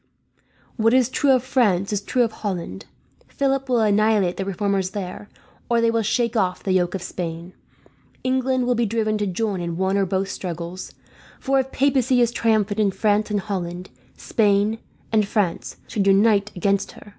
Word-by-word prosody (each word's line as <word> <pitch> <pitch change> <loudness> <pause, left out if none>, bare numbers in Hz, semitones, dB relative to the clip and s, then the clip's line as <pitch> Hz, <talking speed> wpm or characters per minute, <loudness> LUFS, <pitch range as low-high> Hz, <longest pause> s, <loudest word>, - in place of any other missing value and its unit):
"What 225 +1 +3
is 255 -2 +3
true 275 +2 0
of 255 -2 +4
France 210 -7 +1
is 205 - -1
true 245 +4 +1
of 230 - -1
Holland. 175 - -5 0.4
Philip 270 -1 -1
will 245 -2 +3
annihilate 210 -3 +2
the 195 - -3
reformers 195 0 -1
there, 195 +1 -6 0.4
or 235 -1 +3
they 230 0 +3
will 230 0 +1
shake 235 +2 0
off 185 -4 0
the 195 - -1
yoke 185 0 +1
of 190 - -5
Spain. 170 0 -6 0.7
England 255 0 +1
will 250 - +2
be 235 -1 0
driven 215 0 0
to 205 - -1
join 195 0 -2
in 170 -1 -4
one 190 +1 +1
or 195 - +1
both 190 +1 -1
struggles; 175 0 -6 0.4
for 270 0 +1
if 265 0 -2
papacy 260 -2 +2
is 240 -1 +3
triumphant 220 -3 +1
in 210 -2 +3
France 210 +2 +1
and 205 -1 0
Holland, 180 -3 -5 0.3
Spain 210 0 +1 0.3
and 215 -2 +2
France 200 -4 -1 0.2
would 200 -2 +1
unite 200 +1 +4
against 200 +2 0
her. - - -15
210 Hz, 180 wpm, -22 LUFS, 190-230 Hz, 0.7 s, of